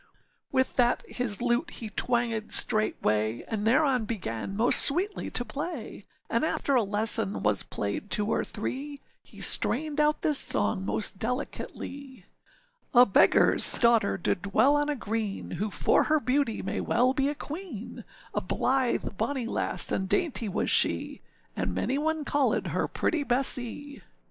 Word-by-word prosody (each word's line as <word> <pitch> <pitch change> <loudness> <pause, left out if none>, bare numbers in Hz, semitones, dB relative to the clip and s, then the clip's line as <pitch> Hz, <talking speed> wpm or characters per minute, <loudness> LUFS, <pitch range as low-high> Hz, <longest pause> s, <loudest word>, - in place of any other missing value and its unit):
â - - -32 0.5
With 260 -1 0
that 245 -1 +2
his 240 -3 -2
lute 245 +7 0
he 225 -9 -7
twangèd 235 -3 -1
straightway, 110 - +1
And 220 -1 -3
thereon 255 -1 +2
began 195 - -5
most 235 +3 +4
sweetly 370 +8 +1
to 245 - -3
play, 280 - -6 0.2
And 230 - 0
after 285 -2 -1
a 250 - +4
lesson 200 - +1
was 105 -2 +2
played 100 - -5
two 210 - +1
or 220 - -1
three, 275 +7 -5 0.3
He - - -12
strained 300 +3 +5
out 300 0 +1
this 300 -3 +2
song 100 -3 +1
most 110 - +1
delicately:â 260 -1 -6 0.7
âA 245 -6 +5
beggarâs - - +4
daughter 230 -5 +3
did 175 - -2
dwell 255 +8 +2
on 290 0 0
a 295 - -1
green, 220 -4 -4
Who 210 +2 -3
for - - +2
her 310 0 +2
beauty 265 -4 -1
may - - -3
well 250 +3 +1
be 275 +1 0
a 295 - -3
queen, 295 - -8 0.3
A - - -1
blithe 255 -6 -1
bonny 250 +2 -2
lass, 230 - -1
and 190 0 -2
dainty 265 - 0
was 190 - -1
she, - - +1 0.3
And - - -3
many 270 +3 -1
one 315 0 -2
callèd 285 -1 0
her - - -1
pretty 320 -4 -1
Bessee. 265 +2 -1
245 Hz, 155 wpm, -27 LUFS, 210-285 Hz, 0.7 s, strained